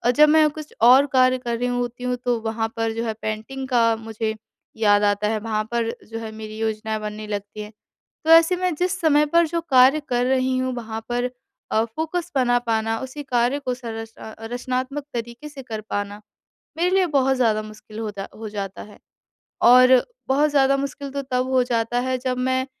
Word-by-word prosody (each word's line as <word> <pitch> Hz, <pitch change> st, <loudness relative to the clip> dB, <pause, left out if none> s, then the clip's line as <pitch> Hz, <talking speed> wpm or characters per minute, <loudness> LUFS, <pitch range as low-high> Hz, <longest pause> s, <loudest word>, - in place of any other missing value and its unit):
जब 300 Hz, 0 st, +7 dB
मैं 310 Hz, 0 st, +5 dB
कुछ 305 Hz, 0 st, -10 dB
और 255 Hz, +4 st, +7 dB
कार्य 255 Hz, 0 st, +4 dB
कर 240 Hz, -2 st, -3 dB
रही 245 Hz, +1 st, -1 dB
होती 245 Hz, 0 st, -3 dB
हूँ 250 Hz, 0 st, 0 dB
तो 245 Hz, -2 st, +1 dB
वहाँ 225 Hz, 0 st, -2 dB
पर 225 Hz, 0 st, 0 dB
जो 230 Hz, -, -3 dB
है 220 Hz, -, -1 dB
पेंटिंग 220 Hz, +5 st, -4 dB
का 230 Hz, -3 st, +3 dB
मुझे 220 Hz, 0 st, -4 dB, 0.4 s
याद 205 Hz, -2 st, +4 dB
आता 205 Hz, 0 st, +2 dB
है, 215 Hz, 0 st, 0 dB
वहाँ 215 Hz, 0 st, -2 dB
पर 235 Hz, -1 st, 0 dB, 0.2 s
जो 225 Hz, 0 st, -5 dB
है 225 Hz, -1 st, -6 dB
मेरी 215 Hz, 0 st, -8 dB
योजनाएँ 220 Hz, 0 st, -2 dB
बनने 215 Hz, 0 st, -6 dB
लगती 205 Hz, 0 st, -5 dB
हैं। 210 Hz, 0 st, -8 dB, 0.5 s
तो 320 Hz, -, +1 dB
ऐसे 330 Hz, +2 st, +7 dB
मैं 365 Hz, -2 st, -1 dB
जिस 365 Hz, +4 st, -1 dB
समय 300 Hz, -2 st, +4 dB
पर 335 Hz, +3 st, +3 dB
जो 335 Hz, +2 st, -2 dB
कार्य 260 Hz, +3 st, +6 dB
कर 245 Hz, 0 st, +1 dB
रही 260 Hz, 0 st, +1 dB
हूँ 255 Hz, 0 st, -1 dB
वहाँ 225 Hz, -2 st, -5 dB
पर 245 Hz, +1 st, -1 dB, 0.4 s
अ, 220 Hz, +1 st, +3 dB
फ़ोकस 320 Hz, +9 st, -4 dB
बना 245 Hz, -2 st, +3 dB
पाना, 225 Hz, -1 st, -1 dB
उसी 265 Hz, +3 st, -6 dB
कार्य 250 Hz, 0 st, +1 dB
को 255 Hz, -3 st, -3 dB
सरच 225 Hz, -2 st, -7 dB
रचनात्मक 250 Hz, +5 st, -4 dB
तरीके 235 Hz, +5 st, -6 dB
से 285 Hz, -2 st, -10 dB
कर 220 Hz, -3 st, -6 dB
पाना 205 Hz, 0 st, -3 dB, 0.6 s
मेरे 350 Hz, +2 st, +1 dB
लिए 375 Hz, -2 st, +3 dB
बहुत 265 Hz, 0 st, +2 dB
ज़्यादा 220 Hz, -4 st, +2 dB
मुश्किल 215 Hz, 0 st, -12 dB
हो 220 Hz, -1 st, -3 dB
जा 195 Hz, -, -5 dB
हो 220 Hz, 0 st, -6 dB
जाता 200 Hz, -2 st, -6 dB
है। 210 Hz, -, -14 dB, 0.6 s
और 255 Hz, +1 st, +7 dB, 0.3 s
बहुत 290 Hz, +3 st, +3 dB
ज़्यादा 275 Hz, -1 st, +3 dB
मुश्किल 280 Hz, 0 st, -5 dB
तो 280 Hz, +1 st, -4 dB
तब 255 Hz, +1 st, +1 dB
हो 260 Hz, -1 st, +4 dB
जाता 235 Hz, -1 st, 0 dB
है 255 Hz, 0 st, -1 dB
जब 255 Hz, 0 st, -2 dB
मैं 260 Hz, +1 st, 0 dB
245 Hz, 200 wpm, -22 LUFS, 220-270 Hz, 0.6 s, जब